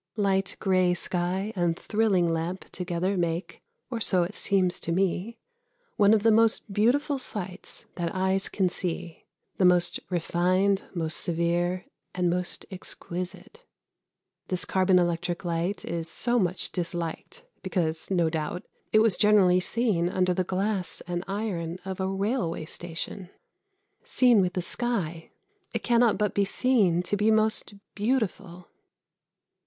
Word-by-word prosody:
Light 195 -2 +1
grey 185 -2 +2
sky 180 +4 -1
and 175 -2 +1
thrilling 205 -5 +1
lamp 165 +3 -2
together 180 +2 -2
make 170 0 -2 0.3
or 230 -2 -3
so 185 -4 +3
it 175 +4 -4
seems 190 -4 +1
to 170 - -4
me 190 +5 0 0.6
one 205 0 +5
of 215 -2 +4
the 225 - +5
most 225 -1 +2
beautiful 270 +7 +2
sights 190 -7 -6
that 170 -1 -1
eyes 190 +1 +1
can 190 -2 +1
see 175 -2 -4 0.3
the - - +1
most 180 -1 +4
refined, 185 +3 +1
most 160 -2 -1
severe, 175 +1 0 0.3
and 180 -1 +1
most 180 0 -3
exquisite. 185 - -6 0.8
This 185 -1 +1
carbon 185 -1 +3
electric 175 +1 0
light 170 +4 -2
is 165 -1 0
so 240 +5 +1
much 185 -2 0
disliked 175 - -4 0.2
because, 165 -4 -2
no 175 -4 +2
doubt, 160 +2 -3 0.3
it 215 - +5
was 220 -5 +3
generally 200 -4 +5
seen 190 -4 +1
under 185 0 +1
the 185 +1 0
glass 190 +1 -1
and 175 0 -3
iron 190 -5 -3
of 190 0 -5
a 190 - 0
railway 195 -4 -1
station. 175 +3 -6 0.7
Seen 245 -5 +4
with 180 -1 0
the 180 - -2
sky 180 -8 -2 0.5
it - - -2
cannot 235 -2 +3
but 210 -2 0
be 200 - +2
seen 200 -5 +2
to 195 - -1
be 210 +2 +2
most 220 -1 +1 0.2
beautiful. 200 -6 -2
185 Hz, 140 wpm, -27 LUFS, 175-205 Hz, 0.8 s, one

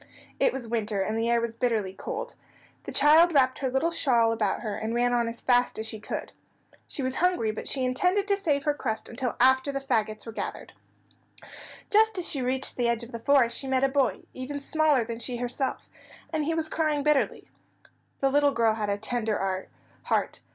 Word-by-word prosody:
It - - +4
was 245 -3 -6
winter, 215 -3 -1
and 215 - -2
the 225 +1 0
air 235 0 +3
was 230 -1 -3
bitterly 225 -5 -1
cold. 470 - -5 0.5
The - - -5
child 315 +3 +5
wrapped 260 -2 +3
her 265 - -1
little 265 +6 +1
shawl 240 -8 +3
about 215 -3 -1
her, 215 -3 -3
and 220 +3 -3
ran 245 0 +2
on 240 -1 +1
as 230 0 -5
fast 245 -1 +2
as 220 - -3
she 220 -1 -6
could. 210 - -5 0.6
She 280 - -4
was 260 0 -1
hungry, 350 -12 +2
but 215 - -5
she 265 -2 0
intended 365 +10 +1
to 400 - +3
save 295 -8 0
her 295 - +1
crust 220 -6 -4
until 245 0 -3
after 260 +2 +4
the 275 - -2
fagots 220 -5 -1
were 225 - -6
gathered. - - -6 1.2
Just 435 -1 +4
as 360 - -2
she 275 - -2
reached 260 +1 -1
the 240 -1 +1
edge 235 0 0
of 235 - -10
the 230 - -6
forest 255 -1 +3
she 270 - -4
met 265 0 +1
a 270 - +4
boy, 265 -2 +1
even 270 +3 -5
smaller 300 -2 +2
than 230 0 -5
she 240 +1 -3
herself, 245 +2 -3 0.5
and 310 -2 0
he 325 +1 0
was 320 -1 -1
crying 310 -2 0
bitterly. 300 -2 +1 0.7
The 270 -1 +2
little 285 0 +3
girl 230 -3 +3
had 215 -2 -2
a 200 - 0
tender 210 -4 -2 0.4
heart. - - 0
255 Hz, 205 wpm, -27 LUFS, 230-290 Hz, 1.2 s, child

